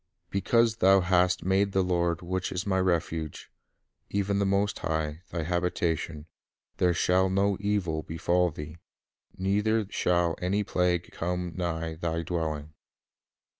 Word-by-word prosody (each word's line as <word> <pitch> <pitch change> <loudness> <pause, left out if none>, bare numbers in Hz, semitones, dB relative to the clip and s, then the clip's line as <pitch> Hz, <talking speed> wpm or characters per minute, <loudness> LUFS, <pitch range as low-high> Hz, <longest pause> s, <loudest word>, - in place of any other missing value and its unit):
Because 115 +4 +2
thou 95 -1 +5
hast 90 0 +2
made 95 +1 +2
the 95 - +3
Lord, 85 -1 0
which 95 +1 -2
is 90 +2 -3
my 95 -2 +1
refuge, 80 -4 -1 0.6
Even 100 0 0
the 100 - +2
Most 100 +1 +1
High, 80 0 -2
thy 85 -2 -3
habitation; 85 -2 -1 0.5
There 90 -1 +2
shall 95 +2 +3
no 100 +1 +2
evil 100 -6 0
befall 85 +3 +1
thee, 75 +1 -8 0.6
Neither 105 +3 +1
shall 85 -1 +1
any 100 +3 +1
plague 90 -2 0
come 90 +1 -3
nigh 80 -2 -2
thy 85 0 -2
dwelling." 80 -3 -3
90 Hz, 130 wpm, -28 LUFS, 85-95 Hz, 0.6 s, thou